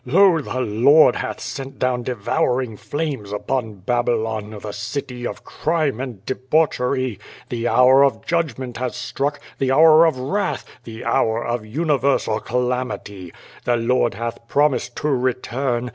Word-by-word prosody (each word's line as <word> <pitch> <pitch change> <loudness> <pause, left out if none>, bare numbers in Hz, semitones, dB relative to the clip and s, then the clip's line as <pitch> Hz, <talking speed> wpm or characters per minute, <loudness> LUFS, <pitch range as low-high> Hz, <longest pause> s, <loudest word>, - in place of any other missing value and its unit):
Lol 170 +4 +4
the 130 -2 -3
Lord 125 +8 +5
hath - - -4
sent 135 0 -6
down 125 -1 0
devouring 120 +1 -1
flames 140 -5 -4
upon 110 +1 -2
Babylon, 110 0 -1
the 105 0 -6
city 125 +4 -5
of - - -8
crime 155 -6 -1
and 125 -7 -6
debauchery. 130 - 0 0.3
The 120 -1 -2
hour 130 +3 +6
of 130 -5 +1
judgment 140 -7 -2
has 125 0 -3
struck, 140 +3 -2 0.2
the 130 -1 +1
hour 160 +3 +7
of 160 - 0
wrath, 170 +11 -2 0.2
the 115 0 -8
hour 110 +1 +1
of 120 -2 -3
universal 140 -4 +1
calamity. 120 -7 -3 0.3
The 120 -1 +1
Lord 120 -2 +1
hath 115 +1 -5
promised 135 -3 +1
to - - -2
return. 125 -1 -1
125 Hz, 140 wpm, -21 LUFS, 115-140 Hz, 0.3 s, hour